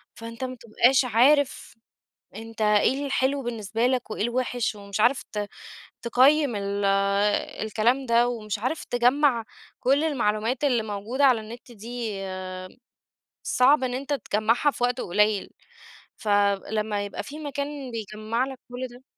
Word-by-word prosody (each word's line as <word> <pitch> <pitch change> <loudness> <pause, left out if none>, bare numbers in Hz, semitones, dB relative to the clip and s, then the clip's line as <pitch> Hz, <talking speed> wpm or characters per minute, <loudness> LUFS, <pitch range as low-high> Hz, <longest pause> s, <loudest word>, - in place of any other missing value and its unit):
فأنت 230 +1 -8
ما 255 0 -4
بتبقاش 245 +3 +2
عارف 255 +3 +2 0.6
أنت 225 0 -10
إيه 215 +7 +2
الحلو 275 +1 0
بالنسبة 230 0 -2
لك 250 -3 -1
وإيه 210 - -3
الوحش. 240 -1 -1
ومش 200 0 -6
عارف 250 +4 +3
ت 205 -1 -3 0.5
تقيّم 260 +1 +4
ال 200 0 -2 0.8
الكلام 240 +5 +1
ده 235 +1 +3
ومش 215 -3 -4
عارف 255 +9 -3
تجمّع 245 0 +2 0.4
كل 280 +4 +2
المعلومات 240 -2 0
اللي 245 -5 +2
موجودة 215 +6 -2
على 250 -5 +5
النت 235 +4 -11
دي، 230 0 -5 1.3
صعب 260 +2 +3
إن 250 -1 -2
أنت 280 +3 -4
تجمّعها 230 +3 +1
في 245 - -3
وقت 245 +1 0
قليل، 210 +2 +1 0.7
فلما 205 0 0
يبقى 200 - -6
في 300 +2 -9
مكان 285 -2 -5
بيجَمع 220 +2 -3
لك 265 -1 -8
كل 250 +1 -5
ده 245 +1 -16
240 Hz, 135 wpm, -25 LUFS, 215-260 Hz, 1.3 s, على